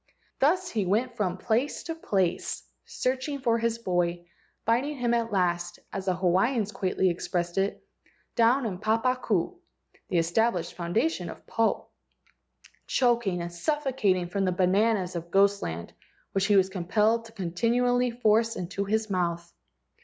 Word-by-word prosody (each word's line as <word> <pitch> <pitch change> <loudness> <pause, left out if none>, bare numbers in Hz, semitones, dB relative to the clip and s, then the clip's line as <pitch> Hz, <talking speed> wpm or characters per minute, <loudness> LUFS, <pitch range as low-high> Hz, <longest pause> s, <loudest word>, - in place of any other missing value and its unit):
Thus 360 +7 +3
he 215 -3 0
went 235 +6 +1
from 190 -5 -1
place 235 +8 0
to 330 - -4
place, 190 - -1 0.2
searching 260 +3 -2
for 230 -2 +2
his 230 0 0
boy, 175 -5 -1 0.4
finding 255 +6 +1
him 240 -2 +1
at 230 -1 0
last, 175 -2 0 0.2
as 195 -1 -4
the 185 - +2
Hawaiians 195 +5 +1
quaintly 190 -2 +1
expressed 175 +1 -2
it, 195 +1 -2 0.5
"down 240 +2 +4
in 215 - -1
the 180 - -8
papa 225 +4 +2
ku" 215 - -1 0.5
(the 180 - +1
established 175 +2 +1
founda¬ 180 - +1
tion 180 - -5
of - - -10
Po), 225 0 0 1.0
choking 235 -8 +1
and 175 0 -6
suffocating 245 - 0
from 195 +2 -1
the 185 - +2
bananas 190 +1 +2
of 170 0 -5
ghost 200 +2 +3
land 85 +1 -5 0.4
which 195 0 +1
he 205 - +4
was 190 -1 +5
compelled 210 +5 +1
to 225 - -13
continually 235 +6 +1
force 230 -1 +2
into 190 +2 -3
his 220 +2 0
mouth. 170 -3 -2
205 Hz, 155 wpm, -27 LUFS, 180-235 Hz, 1.0 s, was